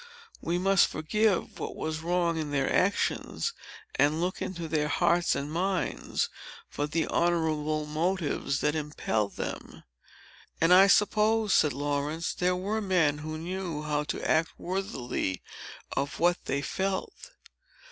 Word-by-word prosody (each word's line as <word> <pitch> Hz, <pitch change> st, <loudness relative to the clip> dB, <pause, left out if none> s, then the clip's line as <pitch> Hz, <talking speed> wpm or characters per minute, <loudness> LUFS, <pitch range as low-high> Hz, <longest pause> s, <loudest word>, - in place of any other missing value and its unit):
We 170 Hz, +1 st, -1 dB
must 195 Hz, +1 st, +4 dB
forgive 210 Hz, +5 st, 0 dB
what -, -, -4 dB
was 155 Hz, 0 st, -3 dB
wrong 170 Hz, 0 st, +1 dB
in 155 Hz, -2 st, -3 dB
their 135 Hz, -2 st, 0 dB
actions, 200 Hz, -, 0 dB, 0.5 s
and 150 Hz, +2 st, +3 dB
look 180 Hz, +2 st, -2 dB
into 170 Hz, -3 st, -4 dB
their 155 Hz, -2 st, 0 dB
hearts 175 Hz, +2 st, +2 dB
and 145 Hz, +2 st, -3 dB
minds 185 Hz, +2 st, -1 dB, 0.4 s
for 145 Hz, -, -3 dB
the 160 Hz, +2 st, 0 dB
honorable 155 Hz, -3 st, 0 dB
motives 155 Hz, -2 st, -1 dB
that 150 Hz, -, +2 dB
impelled 145 Hz, -9 st, -2 dB
them." -, -, -6 dB, 0.8 s
"And 165 Hz, +2 st, +5 dB
I 190 Hz, +2 st, +8 dB
suppose," 215 Hz, +1 st, +3 dB
said 150 Hz, -, +4 dB
Laurence, 145 Hz, +4 st, -2 dB
"there 180 Hz, 0 st, +1 dB
were 205 Hz, +4 st, -2 dB
men 170 Hz, -7 st, +2 dB
who 155 Hz, +1 st, -5 dB
knew 170 Hz, -2 st, -4 dB
how 150 Hz, 0 st, 0 dB
to -, -, -3 dB
act 160 Hz, 0 st, +1 dB
worthily 135 Hz, -, -3 dB, 0.5 s
of 140 Hz, +1 st, -2 dB
what 175 Hz, +1 st, +2 dB
they 140 Hz, +1 st, -1 dB
felt." 195 Hz, -, -3 dB
165 Hz, 135 wpm, -28 LUFS, 150-185 Hz, 0.8 s, I